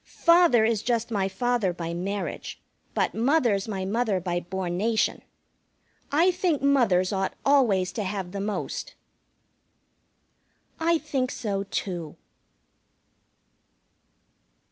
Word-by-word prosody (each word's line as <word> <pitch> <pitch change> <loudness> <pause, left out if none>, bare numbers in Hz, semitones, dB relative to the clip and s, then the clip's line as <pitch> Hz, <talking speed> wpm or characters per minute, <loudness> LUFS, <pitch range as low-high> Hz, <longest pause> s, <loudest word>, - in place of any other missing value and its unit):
Father 335 -9 +4
is 225 -2 +1
just 235 -1 -1
my 195 -3 +1
father 220 0 0
by 170 -1 -5
marriage, 195 +4 -4 0.4
but - - +1
Mother's 235 -5 +2
my 195 -3 -3
mother 215 -1 0
by 175 -1 -2
bornation. 190 +5 -1 0.9
I 335 +6 +4
think 355 -5 0
mothers 215 -10 +3
ought 195 0 -1
always 225 -11 +3
to 210 +3 -3
have 190 -2 -4
the 200 0 -4
most." 210 +1 -4 1.8
I 335 +1 +3
think 275 -5 -2
so, 200 -3 -3
too. 175 -6 -4
210 Hz, 105 wpm, -26 LUFS, 190-255 Hz, 1.8 s, Father